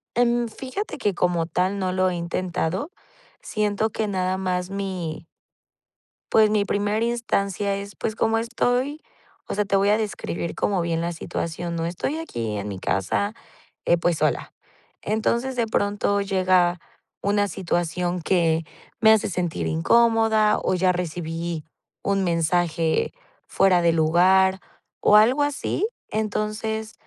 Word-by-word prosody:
Em, 240 0 +2
fíjate 265 - -5
que, 205 -7 0
como 175 -2 +1
tal, 185 +3 0
no 185 -1 -1
lo 185 0 +2
he 180 - -3
intentado. 180 - -2 0.5
Siento 210 +1 0
que 220 - -2
nada 185 -1 -1
más 180 -1 -2
mi 185 -5 -4 1.1
pues, 215 -1 +5
mi 210 -1 +3
primera 205 +2 0
instancia 200 -4 0
es, 200 0 -7
pues, 220 - -3
como 225 0 +1
estoy, 245 +5 0 0.5
o - - -3
sea, 210 0 +1
te 195 0 0
voy 200 +1 +3
a 210 - +4
describir 195 -5 -3
como 195 -3 0
bien 165 -1 -1
la 170 +1 -1
situación, 170 +1 -4
¿no? 165 0 -1
Estoy 265 - -3
aquí 115 - -4
en 100 0 -4
mi 100 -2 -5
casa, 100 - -1 0.5
eh, 170 - +4
pues, 170 -1 0
sola. - - 0 0.5
Entonces, 235 +4 0
de 235 -2 +1
pronto 205 -1 0
llega 185 -3 +2 0.4
una 205 0 +1
situación 175 0 -2
que 165 -2 +2 0.4
me 220 0 +6
hace 220 -1 +4
sentir 175 -2 -2
incómoda, 225 +4 +3
o 185 - +1
ya 185 0 +3
recibí 170 -2 -4 0.4
un 195 -1 +1
mensaje 165 -1 +1 0.4
fuera 185 -2 +3
de 170 -1 +4
lugar, 185 +4 +4 0.4
o 210 - +5
algo 245 +7 +5
así. 290 +7 -1 0.2
Entonces, 215 +1 -2
195 Hz, 140 wpm, -24 LUFS, 175-215 Hz, 1.1 s, me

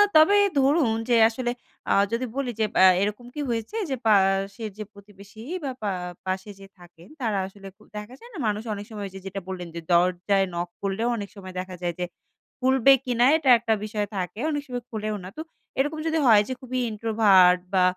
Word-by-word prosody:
তবে 315 +6 +7 0.2
ধরুন 275 -4 +3
যে, 240 - +4
আসলে 240 +1 -3 0.4
আ - - +4 0.2
যদি 240 +2 0
বলি 270 -3 -2
যে, - - +3
এব - - -16 0.3
এরকম 210 +4 -3
কি 295 - -3
হয়েছে 225 - -3 0.2
যে, - - +1
পাশের 195 +2 +2
যে 215 - -3
প্রতিবেশী 200 +1 -15 0.2
বা 270 - -2
পা 205 - 0 0.4
পাশে 190 +2 -3
যে - - -10 0.2
থাকেন, 175 0 -16 0.2
তারা 215 -4 0
আসলে 195 0 -12 0.3
দেখা 210 +4 -8
যায় 475 - -13
না, - - -9
মানুষ 210 +1 -1
অনেক 205 0 -7
সময় 205 -2 -5
যে, 195 - -8
যেটা 195 +1 -5
বললেন 180 -2 -5
যে, - - -3 0.2
দরজায় 185 +3 +2
নক 175 0 -3
করলেও 200 +4 -1
অনেক 200 -2 -6
সময় 185 -2 -10
দেখা 185 0 -8
যায় 175 -1 -1
যে 180 - 0 0.5
খুলবে 265 +1 +5
কিনা, 245 -1 +2
এটা 275 -5 0
একটা 230 -1 0
বিষয় 210 -1 -2
থাকে, 180 +2 -4
অনেক 290 -1 -1
সময় 245 -2 -5
খোলেও 215 -1 -3
না। 185 - -7
তো - - -4 0.4
এরকম 295 +3 0
যদি 320 0 +1
হয় 215 -3 +7
যে, 260 - -3
খুবই 255 0 -3
ইন্ট্রোভার্ট 205 -5 +4
বা 185 - +5
210 Hz, 195 wpm, -25 LUFS, 195-245 Hz, 0.5 s, তবে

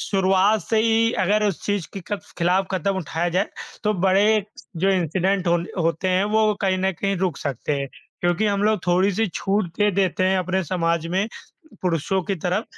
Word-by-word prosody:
शुरुआत 195 +2 +2
से 225 - 0
ही 230 +1 +3
अगर 210 +3 +2
उस 200 -5 -1
चीज़ 205 -4 -1
के 195 - -6
कफ 205 -1 -4
ख़िलाफ़ 180 +3 +2
कदम 190 +1 -1
उठाया 170 0 -2
जाए 200 - +1 0.4
तो 210 - +3
बड़े 190 +2 +4 0.5
जो 190 +4 +1
इंसिडेंट 185 +1 0
हो 170 0 +4 0.3
होते 165 +3 0
हैं, 185 +2 +2
वो 215 0 +2
कहीं 190 -1 +1
न 190 +1 +1
कहीं 195 -1 0
रुक 185 -3 -1
सकते 140 0 -3
हैं। 140 - -2 0.3
क्योंकि 175 +5 +1
हम 200 -1 0
लोग 215 -3 +2
थोड़ी-सी 190 +5 +2
छूट 200 0 0
दे 210 0 +4
देते 185 -1 +1
हैं 190 0 +2
अपने 185 +1 0
समाज 165 -1 0
में 200 +3 +1 0.6
पुरुषों 180 +2 0
की 195 +3 -2
तरफ 180 +6 -1
190 Hz, 190 wpm, -22 LUFS, 175-205 Hz, 0.6 s, बड़े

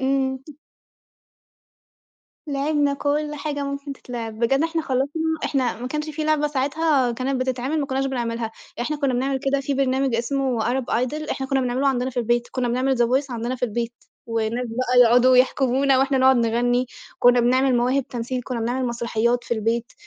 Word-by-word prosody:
إمم. 265 0 0 2.1
لعِبنا 285 0 0
كلّ 295 +1 -1
حاجة 290 -1 -3
ممكن 280 0 -5
تتلعب، 230 -4 -7
بجد 270 +5 +2
إحنا 325 0 -1
خلّصنا 280 +3 -1 0.2
إحنا 255 -4 -1
ما 250 - -4
كانش 300 +3 -3
في 310 +1 -4
لعبة 305 -1 +2
ساعتها 280 -2 +1
كانت 260 +2 -2
بتتعِمل 260 +4 -1
ما 280 - -2
كُنَّاش 270 0 -1
بنعملها، 235 -3 -3 0.3
إحنا 300 +5 -1
كُنَّا 280 -3 0
بنعمل 265 +2 0
كده 275 0 0
في 275 +1 -2
برنامج 265 -1 +1
اسمه 255 +1 0
Arab 250 +3 0
Idol 295 +6 -1
إحنا 265 - -3
كُنَّا 270 0 +1
بنعمله 255 +2 0
عندنا 255 -1 0
في 255 - -19
البيت، 240 0 0
كُنَّا 250 -2 -1
بنعمل 255 +2 +1
the - - -2
voice 265 +4 0
عندنا 240 +1 -3
في 250 - -1
البيت، 235 +1 -3 0.3
والناس 230 +2 -1
بقى 250 +2 +2
يُقعدوا 245 +2 +5
يحكمونا 265 +1 +3
وإحنا 270 0 +2
نقعد 260 0 +5
نغني، 245 +2 +1 0.3
كُنَّا 245 0 +5
بنعمل 255 +2 +3
مواهب 250 +2 +1
تمثيل 245 +1 -3
كُنَّا 245 -2 -4
بنعمل 245 +3 -1
مسرحيات 235 0 0
في 235 - -1
البيت، 230 +2 -1
260 Hz, 175 wpm, -23 LUFS, 240-275 Hz, 2.1 s, يُقعدوا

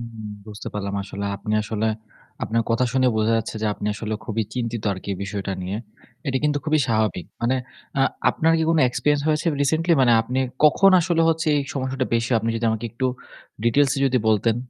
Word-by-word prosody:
উম 115 -2 -8 0.2
বুঝতে 105 0 -7
পারলাম 100 -1 -3
আসলে। 100 +1 -6
আপনি 105 +2 -4
আসলে 110 +1 -2 0.6
আপনার 115 +1 0
কথা 115 +2 +2
শুনে 130 -1 +3
বোঝা 110 +1 +2
যাচ্ছে 110 - -5
যে - - +1
আপনি - - -5
আসলে 110 0 -4
খুবই 110 0 -1
চিন্তিত 115 -3 -3
আরকি 95 +1 -8
এই 95 - -5
বিষয়টা 100 0 -4
নিয়ে। 95 +3 -3 0.5
এটি 130 -1 +1
কিন্তু 145 -1 +2
খুবই 155 0 +2
স্বাভাবিক। 110 -7 0 0.2
মানে 130 +3 +2 0.4
আ - - +3 0.3
আপনার 165 +1 +2
কি - - +1
কোনো 165 - +3
experience 145 +3 +1
হয়েছে 155 +2 +1
recently? 160 +4 +2
মানে 125 -2 +5
আপনি 125 +3 -3 0.3
কখন 195 +6 +6
আসলে 170 -1 +1
হচ্ছে 165 +1 0
এই - - 0
সমস্যাটা 130 -1 -2
বেশি 115 +1 0
আপনি 115 - -2
যদি 115 - -3
আমাকে 110 +1 -3
একটু 130 +3 -1 0.6
details 135 +3 +3
এ - - -1
যদি 130 -1 +2
বলতেন। 110 +1 +2
115 Hz, 195 wpm, -23 LUFS, 110-140 Hz, 0.6 s, কখন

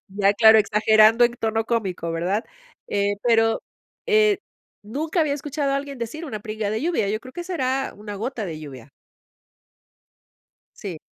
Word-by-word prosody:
Ya, 200 -1 +4
claro, 220 +1 +7
exagerando 215 +2 +5
en 240 - -1
tono 225 0 0
cómico. 190 -8 -2
¿Verdad? 180 +7 -1 0.4
Eh, 205 0 0
pero, 225 -1 +3 0.4
eh, 430 -3 +3 0.4
nunca 310 - -1
había 290 -2 +1
escuchado 290 -1 -2
a - - +1
alguien 275 -1 -4
decir 235 +8 -5
una 220 -8 -5
pringa 215 -1 -3
de 220 +3 -2
lluvia. 325 - 0
Yo 215 +1 -1
creo 255 +1 -13
que 350 - -5
será 270 -7 -2
una 205 0 -8
gota 225 0 -4
de 160 -3 -6
lluvia. 140 -3 -11 1.9
Sí. 180 -6 -7
225 Hz, 155 wpm, -23 LUFS, 205-275 Hz, 1.9 s, claro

